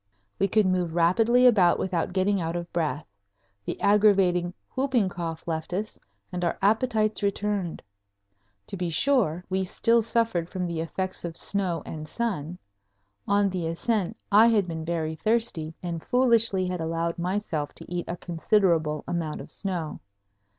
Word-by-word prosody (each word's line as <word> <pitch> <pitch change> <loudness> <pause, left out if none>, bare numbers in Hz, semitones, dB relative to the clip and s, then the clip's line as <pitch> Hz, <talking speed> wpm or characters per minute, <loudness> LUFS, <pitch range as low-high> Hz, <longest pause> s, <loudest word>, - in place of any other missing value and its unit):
We 195 - +3
could 215 +2 +3
move 180 -3 0
rapidly 225 +9 +4
about 195 -8 +5
without 180 -3 -1
getting 190 +1 +1
out 165 +1 -2
of 175 0 -5
breath; 160 -2 -1 0.6
the - - -4
aggravating 195 -4 +3 0.2
"whooping 260 -7 +1
cough" 165 -2 -5
left 160 +1 -3
us; 210 +4 -3 0.3
and 180 -1 -3
our 170 - 0
appetites 215 +1 +1
returned. 200 -3 -2 0.8
To - - -6
be 180 -1 -2
sure, 180 - +1
we 190 +1 0
still 230 +5 +2
suffered 225 -7 0
from 185 -2 -3
the 170 -2 -3
effects 185 +4 -3
of 170 -1 -5
snow 185 -5 -1
and 155 -1 -7
sun. 180 -6 -3 0.7
On 200 0 +3
the 180 -3 -2
ascent 205 +4 -1
I 215 +3 +7
had 210 -5 +3
been 160 -2 -5
very 160 -2 -2
thirsty 215 -8 0
and 170 -2 -4
foolishly 230 -6 +3
had 180 -2 -3
allowed 165 +1 -2
myself 175 -5 -2
to - - -11
eat 175 0 -3
a 175 - -4
considerable 165 -3 +1
amount 165 -3 -3
of - - -8
snow. 175 -6 -4
180 Hz, 155 wpm, -26 LUFS, 165-210 Hz, 0.8 s, I